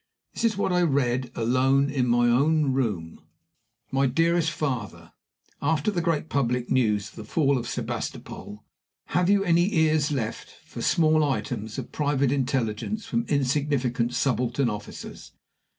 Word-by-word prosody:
This - - -4
is 225 -3 +2
what 190 -2 0
I 180 - +3
read 130 -5 +1
alone 130 +4 +2
in 130 -3 0
my 120 0 +3
own 140 +3 +3
room: 105 -11 -2 0.7
"MY 135 0 +2
DEAREST 165 +4 +2
FATHER 130 -9 -4 0.5
After 160 +6 +1
the 175 -4 -1
great 165 -2 0
public 125 -4 -1
news 110 -5 +1
of - - -20
the 110 - -6
fall 140 +5 +1
of 120 -2 -3
Sebastopol, 105 +1 -5 0.5
have 180 +1 +2
you 200 -1 +4
any 175 +2 +3
ears 155 -2 +2
left 115 -6 -4
for - - -8
small 155 -1 +3
items 110 -5 -3
of - - -6
private 145 -3 +1
intelligence 130 - -1
from 235 - -1
insignificant 135 -4 0
subaltern 125 -1 +1
officers? 105 - -8
135 Hz, 145 wpm, -25 LUFS, 120-155 Hz, 0.7 s, you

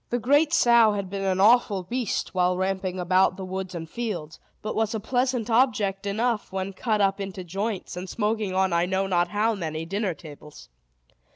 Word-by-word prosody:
The 240 - 0
great 285 +6 +3
sow 235 -7 +5
had 200 -2 -4
been 195 -1 -3
an 190 -1 0
awful 210 -2 +4
beast, 240 +4 -3
while 180 -1 +2
ramping 190 0 -2
about 185 +1 +2
the 190 - -5
woods 185 0 -5
and 165 -1 -5
fields, 175 -7 -5 0.2
but 215 - -3
was 220 0 0
a - - -1
pleasant 250 0 0
object 215 -5 +1
enough 220 +2 -1
when 190 +1 -3
cut 215 +2 0
up 195 0 +1
into 195 -1 -5
joints, 195 +3 -4
and 180 +1 -6
smoking 210 -2 -1
on 190 -1 +2
I 170 +1 +2
know 190 +1 0
not 175 -2 +1
how 210 +5 +1
many 160 -5 -4
dinner 195 0 -2
tables. 150 -2 -13
195 Hz, 190 wpm, -25 LUFS, 185-220 Hz, 0.2 s, sow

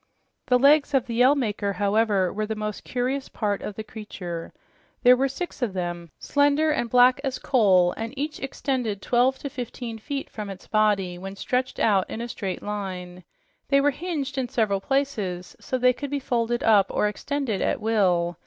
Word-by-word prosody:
The 250 - +5
legs 285 +2 +4
of 260 -2 +2
the 235 - -5
Yell 250 +5 +5
Maker, 210 -6 -1
however, 200 -1 +1
were 215 +1 -2
the 220 - -3
most 210 -1 -4
curious 260 +2 -2
part 205 -2 -2
of 210 - -6
the 220 - -5
creature. 195 -6 -7 0.5
There 250 0 +8
were 270 +2 +1
six 285 +2 -6
of 230 -6 -1
them, 175 -2 -4
slender 290 +2 +2
and 240 -6 -1
black 250 +2 +5
as 265 -2 -2
coal, 190 -8 +4
and 225 +1 -4
each 300 +3 -3
extended 255 -7 -2
twelve 250 +2 +2
to 280 - -6
fifteen 240 -2 -6
feet 275 +4 -4
from 210 -2 -7
its 195 -1 -9
body 205 -5 +1
when 195 +1 -7
stretched 250 +5 -2
out 195 -4 +2
in - - -5
a 235 - -4
straight 195 -5 -5
line. 185 -3 -5 0.5
They 275 - +5
were 290 +1 +3
hinged 285 -4 -3
in 250 -2 -2
several 200 -4 0
places 215 -10 -2
so 260 - -2
they 250 0 +4
could 285 +3 -6
be 285 0 -1
folded 240 -2 -1
up 205 -3 +5
or 210 - +1
extended 260 0 -2
at - - 0
will. 180 -6 +1
225 Hz, 190 wpm, -25 LUFS, 200-265 Hz, 0.5 s, There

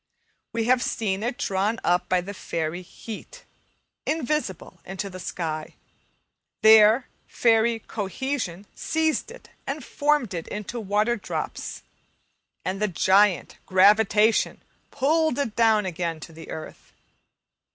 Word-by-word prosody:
We 230 - -1
have 250 +2 +3
seen 200 -5 -1
it 240 +2 -2
drawn 200 +4 0
up 180 +1 +1
by 185 -1 +3
the 200 +3 -7
fairy 165 -2 -3
"heat," 225 - -10 0.6
invisible 300 - -2
into 190 +1 -5
the 185 - -8
sky; 160 -3 -4 0.9
there 220 +3 +7 0.2
fairy 230 0 +3
"cohesion" 210 -2 -4
seized 315 -1 0
it - - -13 0.2
and 275 -1 -4
formed 290 -7 +1
it 165 -2 -5
into 210 +3 -5
water 210 +3 +1
drops 205 - -5 0.8
and 190 +2 -2
the 210 - +3
giant, 190 +1 +3
"gravitation," 210 +3 +4 0.3
pulled 310 +1 +1
it 260 -7 -2
down 220 -3 +4
again 170 -2 -3
to 165 - -10
the 160 +1 -11
earth. 155 - -9
210 Hz, 120 wpm, -25 LUFS, 185-240 Hz, 0.9 s, there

